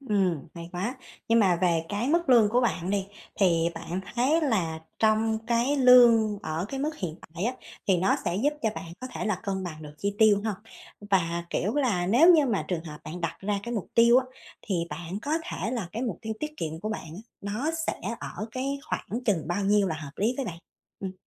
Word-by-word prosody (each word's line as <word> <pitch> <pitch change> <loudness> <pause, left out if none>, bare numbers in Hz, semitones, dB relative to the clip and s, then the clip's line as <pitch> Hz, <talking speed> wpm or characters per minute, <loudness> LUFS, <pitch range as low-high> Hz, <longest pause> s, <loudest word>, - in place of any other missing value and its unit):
Ừm, 190 - 0
hay 170 0 -8
quá. 210 +9 -3 0.3
Nhưng 230 0 +5
mà 185 -4 +4
về 170 -2 +2
cái 210 +6 -1
mức 335 -1 +2
lương 230 -5 +6
của 245 +3 +3
bạn 190 -6 0
đi 200 -1 0 0.3
thì 170 -3 +4
bạn 170 +2 -4
thấy 275 +7 +3
là 185 - 0 0.2
trong 220 0 +2
cái 240 +4 +2
lương 235 -5 +6
ở 160 +3 -2
cái 270 0 -4
mức 305 +2 -2
hiện 165 -5 -4 0.2
tại 175 +5 -2
á, 245 - +1 0.4
thì 185 - +5
nó 185 +3 +2
sẽ 175 - 0
giúp 285 +8 +2
cho 220 - +2
bạn 165 - -7
có 255 - -5
thể - - -3
là 210 -4 -1
cân 190 -3 -2
bằng 155 -3 -7
được 150 0 -10
chi 200 0 -1
tiêu 210 -2 +6
hông? 215 -3 0 0.6
Và, 170 -2 +1
kiểu 205 +8 -1
là, 215 -12 +1
nếu 275 - +6
như 300 -3 +4
mà 225 -5 0
trường 175 -2 -2
hợp 150 -2 -8
bạn 175 +3 -6
đặt 170 - -2
ra 200 +1 -1
cái 235 +2 -4
mục 205 - -3
tiêu 235 +1 +6
á, 260 - 0 0.4
thì 195 - -2 0.2
bạn 170 +5 -5
có 295 - -2
thể 225 - -3
là 225 -9 -3
cái 235 - -3
mục 225 -9 -3
tiêu 220 0 -3
tiết 305 0 -4
kiệm 160 0 -4
của 215 - -3
bạn 215 - -4
á, 200 - -8 0.2
nó 215 +10 -2 0.2
sẽ - - -2 0.2
ở 215 - -5
cái 270 +4 -2
khoảng 240 +4 -3
chừng 175 -7 0
bao 195 +3 -1
nhiêu 200 -1 +3
là 160 - -1
hợp 150 -2 -8
lý 225 +5 +1
với 270 - -2
bạn? 170 -3 -6 0.4
Ừm. 190 -1 -4
205 Hz, 230 wpm, -27 LUFS, 175-240 Hz, 0.6 s, lương